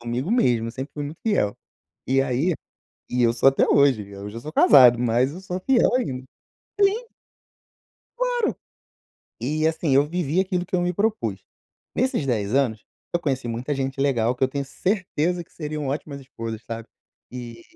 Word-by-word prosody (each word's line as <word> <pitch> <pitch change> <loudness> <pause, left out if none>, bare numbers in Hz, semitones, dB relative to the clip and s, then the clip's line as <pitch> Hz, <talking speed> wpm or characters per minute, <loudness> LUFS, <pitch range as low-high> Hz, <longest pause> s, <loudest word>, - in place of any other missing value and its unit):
Comigo 120 - -3
mesmo, 125 - +2
eu - - -4
sempre 130 +3 -6
fui 145 - -4
muito 150 +3 -7
fiel. 105 - +1 0.5
E 135 +1 +3
aí 135 +7 0 0.6
e 125 0 +1
eu 115 - +5
sou 120 +3 +3
até 135 - +2
hoje, 140 -6 +4
hoje 100 - -14
eu 100 +1 -7
já 115 - -7
sou 150 +6 -8
casado, 125 -4 +7
mas 125 +3 +2
eu 180 - -8
sou 185 -1 -5
fiel 265 -3 +4
ainda. 130 - -2 0.6
Sim! 415 +4 +3 1.1
Claro. - - 0 0.8
E 155 +6 0
assim 160 -3 +1
eu 140 +1 +5
vivi 170 0 0
aquilo 185 -2 -1
que - - -7
eu 180 - +3
me 175 0 0
propus. 175 - -1 0.5
Nesses 255 - 0
10 110 -3 -1
anos, 125 -6 +1 0.3
eu 175 - +2
conheci 135 -6 -2
muita 120 +5 -2
gente 135 0 -3
legal 125 -4 +2
que 130 - +1
eu - - +1
tenho 140 +1 -3
certeza 180 0 -1
que - - -31
seriam 150 -2 -4
ótimas 140 0 -4
esposas, 115 -4 -7
sabe. 115 +1 -7 0.4
E 120 -2 -8
135 Hz, 180 wpm, -24 LUFS, 120-175 Hz, 1.1 s, casado